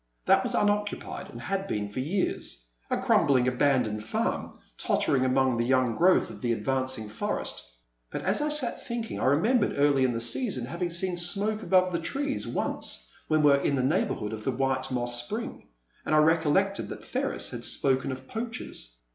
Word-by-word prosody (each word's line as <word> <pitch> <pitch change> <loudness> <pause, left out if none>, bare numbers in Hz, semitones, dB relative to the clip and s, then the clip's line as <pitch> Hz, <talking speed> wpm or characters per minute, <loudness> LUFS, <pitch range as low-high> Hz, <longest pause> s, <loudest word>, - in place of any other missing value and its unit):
That - - +5
was - - -2
unoccupied 205 0 -1
and - - -9
had 195 0 -3
been 105 - -2
for 105 +5 -6
years 150 - -2
— - - -42
a - - +1
crumbling, 130 -3 +3
abandoned 125 -5 +1
farm, 110 - -2 0.2
tottering 130 -2 +1
among 130 -1 +2
the 120 - +1
young 130 -1 +2
growth 185 +2 +4
of - - -12
an 120 -1 +2
advancing 130 0 -1
forest. 105 - -3 0.5
But - - -5
as 195 +8 +1
I 300 - +1
sat 295 -5 0
thinking 235 -1 -4
I - - -1
remembered 205 - +3
early 140 -2 +4
in 125 -2 +2
the 115 - -2
season 120 +1 -1
having 170 +6 -3
seen 175 +1 +1
smoke 200 +5 0
above 185 -3 +3
the 170 - -1
trees 280 - -2
once - - -2 0.2
when 155 -1 +2
we 145 - +7
were 140 - +5
in 140 0 0
the 130 - 0
neighbourhood 135 - 0
of 110 -1 -6
the - - -1
White 130 0 -1
Moss 120 -1 0
Spring, 120 - -6 0.4
and 155 - +1
I - - +5
recollected 160 +5 +3
that - - -8
Ferris - - -2
had - - -6
spoken 135 -1 +1
of 130 0 -8
poachers. 225 - -6
140 Hz, 190 wpm, -28 LUFS, 125-190 Hz, 0.5 s, we